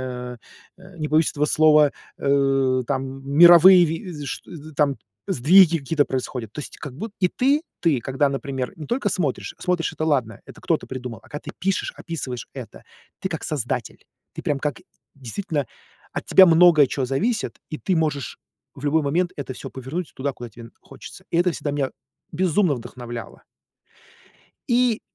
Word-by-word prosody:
э, 125 -1 -6 0.4
э, 185 -1 -15
не 150 - -2
побоюсь 155 +1 +3
этого 145 - +2
слова, 150 -1 +5 0.3
э, 135 -2 +2
там, 135 -1 -3
э, - - -13
мировые 175 +5 +8
ви 170 +4 -4
вс 150 -2 -7
шт - - -5 0.3
там, 140 -4 +2 0.3
сдвиги 170 +5 +5
какие-то 145 +1 +1
происходят. 125 -4 -4
То 150 - -6
есть, - - -9
как 140 -3 -8
буд 215 - -6
и 185 - +3
ты, 280 - +1 0.2
ты, 155 -7 +2
когда, 135 +4 0
например, 135 -2 -4
не 155 - -8
только 240 -3 -1
смотришь, 155 -9 -2
смотришь- 180 -3 -1
это 155 - -1
ладно, 125 -9 0
это - - -13
кто-то - - -1
придумал. 125 -3 -6
А - - -19
когда 145 - -6
ты - - -4
пишешь, 195 0 -1
описываешь 130 -8 -6
это, 125 -6 -10 0.3
ты 190 - -3
как 160 - -5
создатель. 125 -6 -4 0.3
Ты - - -7
прямо 140 -2 -1
как 145 -5 -2 0.4
действительно, 140 - -3 0.5
от - - -5
тебя 190 - +8
много 165 -3 +6
чего 130 +1 -2
зависит, 210 - -1
и 155 - -4
ты 185 -3 0
можешь 150 -4 -2 0.4
в 140 - -10
любой 155 +2 +2
момент 175 +5 0
это 140 -2 -5
всё - - -8
повернуть 140 +7 -6
туда, 140 +1 -2
куда 120 -2 -9
тебе 115 +2 -13
н - - -18
хочется. - - -13
И 170 - +1
это 180 +1 +3
всегда 145 -3 -4
меня 140 -2 -1 0.4
безумно 180 -1 +2
вдохновляло. 120 -1 -8 1.3
И, 240 -2 +2
145 Hz, 175 wpm, -23 LUFS, 130-175 Hz, 1.3 s, мировые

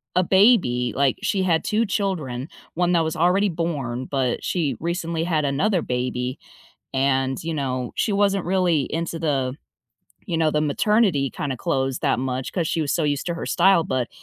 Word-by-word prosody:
a 185 - +4
baby. 180 - +3
Like, 135 -1 +2
she 200 -2 +1
had 170 -3 +2
2 220 +1 +1
children, 155 - -2 0.3
1 175 +1 +1
that 170 -2 +3
was 160 0 -2
already 185 +5 +3
born, 140 -7 -3
but 130 -3 -1
she 165 -6 -1
recently 170 -1 -2
had 160 -3 0
another 165 +7 +1
baby, 125 +1 -2 0.6
and, 135 -1 0
you 165 0 -2
know, 130 -4 -2
she 210 - 0
wasn't 200 -1 +2
really 175 -6 +1
into 165 0 -3
the, 135 -5 0 0.7
you 170 -4 -1
know, 160 -1 +2
the 150 - +1
maternity 155 - +2
kinda 135 -3 -4
clothes 135 -4 -1
that - - +1
much 130 0 -3
'cause 170 -4 -1
she 165 - -1
was 145 - -1
so 165 - 0
used 145 -1 0
to 170 - -1
her 170 - -5
style. 190 -4 +4
But 130 -4 -1
160 Hz, 180 wpm, -23 LUFS, 135-180 Hz, 0.7 s, a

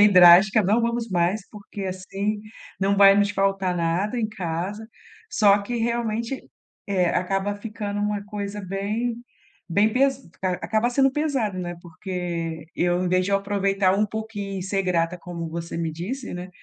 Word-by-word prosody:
bem 205 -1 +7
drástica, 180 +4 +8
não 210 +5 +3
vamos 235 0 -1
mais, 180 +4 +1
porque 205 -1 -9
assim 195 +3 -3 0.4
não 195 +1 +2
vai 195 0 +8
nos 205 0 +3
faltar 195 -2 0
nada 175 +7 0
em 220 -2 0
casa, 195 +2 -4 0.4
só 205 - +4
que 205 +4 -4
realmente, 235 +1 -1 0.5
eh, 190 -3 +1
acaba 195 +2 -1
ficando 205 -1 -5
uma 205 -1 -1
coisa 205 0 -5
bem 210 +5 -2 0.6
bem 210 +3 +3
pes 270 +1 +2 0.2
acaba 215 +5 0
sendo 270 +1 +3
pesado, 270 -10 -1
né, 175 -1 -4
porque 170 -2 -5
eu 175 +1 +1
em - - 0
vez 185 +1 +2
de 200 - -2
eu 200 - +4
aproveitar 195 -1 +1
um 205 +2 +2
pouquinho. 205 -2 -5
Ser 195 +1 -1
grata 175 -1 0
como 170 -1 -6
você 170 +1 -5
me 165 -1 -2
disse, 225 - -5
né, 180 +1 -6
200 Hz, 160 wpm, -24 LUFS, 180-215 Hz, 0.6 s, drástica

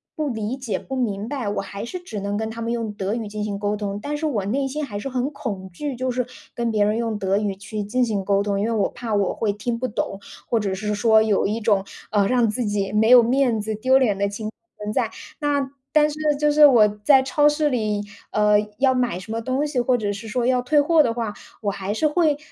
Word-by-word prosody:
不 305 -2 -1
理 225 +1 -3
解、 230 -7 -3
不 270 - -6
明 215 -5 -2
白， 270 -6 -3
我 205 - -1
还 200 +1 -6
是 365 +10 -6
只 290 - -6
能 200 +1 -3
跟 220 +1 -2
他 225 +1 -8
们 230 - -2
用 230 -2 -2
德 200 0 -2
语 225 -2 -3
进 210 0 -4
行 205 -1 -3
沟 205 0 0
通。 205 -1 -4
但 295 +5 -3
是 315 - -3
我 225 -11 -1
内 270 +7 0
心 300 +3 -3
还 210 -8 -5
是 205 - -5
很 255 +1 -1
恐 200 -9 -5
惧， 280 +9 -4
就 255 +1 -2
是 250 0 -1 0.3
跟 235 -1 -1
别 210 -2 +2
人 210 +2 +1
用 225 -2 -2
德 195 0 +1
语 205 -2 -1
去 205 +2 -5
进 250 +5 0
行 210 -5 -1
沟 200 0 +2
通， 200 -1 -1
因 205 - 0
为 230 - -1
我 215 -3 +1
怕 240 -2 -5
我 200 -2 +1
会 210 -3 0
听 230 +3 -3
不 255 +2 -2
懂， 195 -3 -3 0.3
或 230 - +2
者 200 -3 -1
是 210 +2 -2
说 220 +1 +5
有 215 -2 +2
一 215 +3 -1
种， 205 -3 +2 0.2
呃， 205 -1 +2
让 240 -2 +3
自 230 +3 -2
己 205 -2 -1
没 215 +1 +3
有 250 -1 +10
面 240 -2 +2
子， 215 +1 -3
丢 260 +5 +3
脸 220 -7 +2
的 200 0 +1
情 215 +2 -5
况 - - -15 0.3
存 210 0 -4
在。 - - 0 0.3
那 290 -2 +1
么 270 -1 -5 0.2
但 300 -1 +5
是 295 - -8 0.2
就 300 0 +3
是 300 0 +7
我 235 -6 +6 0.2
在 270 +2 +6
超 295 +2 +3
市 295 0 +1
里， 215 -4 -1 0.3
呃 210 0 +4 0.2
要 260 +1 +3
买 250 -7 0
什 185 +4 -9
么 225 +1 -2
东 260 +5 -1
西， 290 -4 -1
或 245 +1 +2
者 205 -3 -2
是 210 +3 -8
说 240 +2 -1
要 250 0 +2
退 295 +4 +3
货 315 +2 +5
的 245 -6 +2
话， 230 -3 -3 0.3
我 205 -2 0
还 195 0 -4
是 225 +9 +1
会， 305 -1 +2
225 Hz, 280 characters per minute, -23 LUFS, 205-260 Hz, 0.3 s, 有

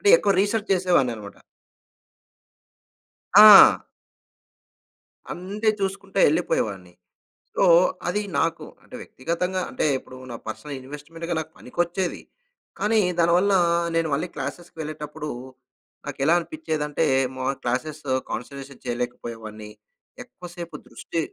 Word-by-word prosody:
అంటే 410 - +1
ఎక్కువ 200 - +2
రిసర్చ్ 210 +1 -1
చేసేవాడిననమాట. 130 - 0 2.0
ఆ! 210 -1 +10 1.5
అంతే 205 +5 -3
చూసుకుంట 195 0 -4
ఎళ్ళిపోయేవాడిని. 100 - -1 0.6
సో - - +2 0.4
అది 205 +4 0 0.2
నాకు 165 0 -1 0.2
అంటే - - -12
వ్యక్తిగతంగా 180 +6 -3
అంటే - - -2
ఇప్పుడు 130 0 -12
నాకు 115 - -9
పర్సనల్ 145 +5 -7
ఇన్వెస్ట్మెంట్‌గా 160 +5 -7
నాకు 160 0 -7
పనికొచ్చేది. 175 +6 -2 0.6
కానీ 220 +1 +2 0.2
దానివల్ల 175 +4 +3 0.4
నేను 165 -1 +1
మళ్ళీ 160 +6 -1
క్లాస్సెస్‌కి 165 +5 -7
వెళ్ళేటప్పుడు 150 0 -6 0.8
నాకేలా 150 +5 +1
అనిపిచ్చేదంటే 160 - -2 0.3
మా 130 - -3 0.2
క్లాస్సెస్‌ 145 +5 -3 0.2
కాన్సంట్రేషన్ 135 +3 -7
చేయలేకపోయేవాడ్ని. 115 -3 -6 0.5
ఎక్కువ 240 -7 -14
సేపు 170 -1 -8
దృష్టి 165 - -5
160 Hz, 100 wpm, -24 LUFS, 135-185 Hz, 2.0 s, ఆ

